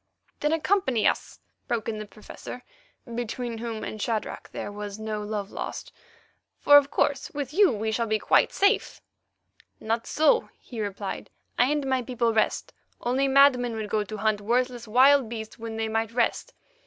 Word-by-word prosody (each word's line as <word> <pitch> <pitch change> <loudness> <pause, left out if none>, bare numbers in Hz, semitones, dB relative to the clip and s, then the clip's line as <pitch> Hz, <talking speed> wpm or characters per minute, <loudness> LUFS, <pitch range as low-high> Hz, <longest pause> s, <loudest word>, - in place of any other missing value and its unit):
"Then 300 - +1
accompany 320 - +1
us," - - -2 0.3
broke 230 -3 -2
in 220 -2 -3
the 215 - -7
Professor, 215 +4 -10 0.5
between 235 0 -4
whom 225 -2 -5
and 215 - -6
Shadrach 220 -1 -3
there - - -6
was 205 0 -6
no 220 -1 -4
love 210 -1 -4
lost, - - -6 0.7
"for, 290 - +6
of 285 -1 +4
course, 285 -1 0
with 285 -1 -4
you 400 +2 +5
we 220 +1 -2
should 230 0 -1
be 215 - +2
quite - - +3
safe." 400 +3 +1 0.8
"Not 225 +1 -2
so," 315 +10 +3
he 235 -3 -8
replied, 200 -1 -5 0.3
"I 245 - +6
and 295 -2 0
my 260 -1 +1
people 235 -1 0
rest; 220 - 0 0.3
only 260 +3 +1
madmen 265 -3 +4
would 215 -2 -5
go 215 -1 +1
to 215 +1 -7
hunt 215 0 0
worthless 245 +2 0
wild 260 +2 +5
beasts 220 0 -7
when 225 0 -6
they 225 0 -1
might 225 0 -1
rest. 235 -1 0
230 Hz, 170 wpm, -26 LUFS, 215-265 Hz, 0.8 s, for